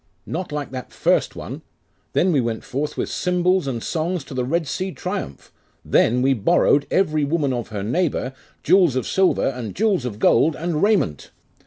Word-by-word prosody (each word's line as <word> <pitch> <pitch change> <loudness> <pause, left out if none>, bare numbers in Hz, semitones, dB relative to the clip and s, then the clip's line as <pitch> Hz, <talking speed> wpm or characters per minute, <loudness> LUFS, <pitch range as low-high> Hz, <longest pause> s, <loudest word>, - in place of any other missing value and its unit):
'Not 175 0 -4
like 145 -2 -4
that 130 -1 -7
first - - +1
one! - - -7 0.5
Then 185 - +3
we 145 -5 +3
went 115 -2 -3
forth 145 +3 -3
with - - -1
cymbals 180 -1 +1
and 120 -4 -3
songs 170 0 -2
to 140 - -10
the 130 -1 -1
Red 165 +6 0
Sea 185 +6 -3
triumph! 180 - -6 0.3
Then 125 +2 +3
we 135 +1 +4
borrowed, 135 +5 +3
every 155 -6 +1
woman 145 -2 0
of 120 -2 -3
her 105 -3 -5
neighbour, 135 - -1 0.3
jewels 180 -8 +4
of 130 - -1
silver, 190 -1 +2
and 125 -5 -6
jewels 205 - +1
of 120 -5 -4
gold, 150 +8 +3
and 165 -2 -2
raiment. 200 - +1
150 Hz, 180 wpm, -22 LUFS, 125-180 Hz, 0.5 s, we